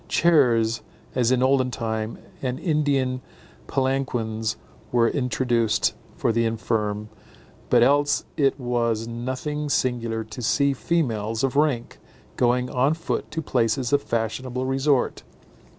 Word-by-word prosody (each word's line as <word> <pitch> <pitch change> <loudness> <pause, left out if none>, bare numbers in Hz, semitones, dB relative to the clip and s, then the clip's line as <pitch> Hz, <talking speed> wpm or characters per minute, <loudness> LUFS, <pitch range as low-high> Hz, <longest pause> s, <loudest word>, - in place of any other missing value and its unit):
Chairs, 120 -9 +3 0.3
as 125 -1 +2
in 130 0 +3
olden 130 -1 +3
time, 110 -2 -3 0.2
and 130 -1 -2
Indian 140 -6 +1 0.5
palanquins 120 -5 -1 0.3
were 120 -1 +4
introduced 120 -3 +1 0.2
for - - +1
the 115 +1 +1
infirm; 110 -2 -1 0.6
but 120 -1 +5
else 145 +2 +3
it 140 -1 +2
was 115 -3 0
nothing 130 +6 -3
singular 120 -4 0
to 110 +2 -9
see 140 +4 +2
females 115 -8 -1
of 135 0 0
rank 140 -5 +1 0.4
going 125 +1 +2
on 135 +5 +1
foot 165 - -3
to 160 +1 -4
places 125 -1 0
of 145 - +4
fashionable 125 +3 -2
resort. 135 0 +1
125 Hz, 120 wpm, -24 LUFS, 115-135 Hz, 0.6 s, but